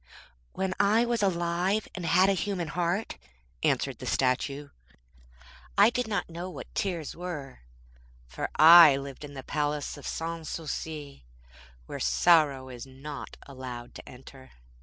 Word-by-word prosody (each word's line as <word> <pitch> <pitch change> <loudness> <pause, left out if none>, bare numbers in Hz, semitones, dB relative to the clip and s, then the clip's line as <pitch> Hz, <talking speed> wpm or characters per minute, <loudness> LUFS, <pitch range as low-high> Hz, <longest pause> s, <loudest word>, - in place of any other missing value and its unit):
'When 190 0 -2
I 215 +4 +4
was 235 -2 -1
alive 180 +2 0
and 180 -3 -5
had 180 +3 +5
a 195 - +3
human 185 -4 -2
heart,' 175 - -2 0.4
answered - - 0
the - - -7
statue, 135 +2 0 1.1
'I 205 +2 +7
did 250 -1 -2
not 210 -2 -2
know 170 +2 -6
what - - -10
tears 175 -7 -3
were, 155 -7 -7 0.7
for - - -5
I 160 -3 +9
lived 140 0 -8
in 145 -1 -9
the 135 - -7
Palace 150 0 -2
of 145 - -9
Sans 165 -1 -4
Souci 150 - -6 0.6
where - - -7
sorrow 135 - +3
is 125 0 -9
not 140 +2 -9
allowed 125 -3 -8
to - - -11
enter. 130 +1 -14
160 Hz, 140 wpm, -28 LUFS, 135-180 Hz, 1.1 s, I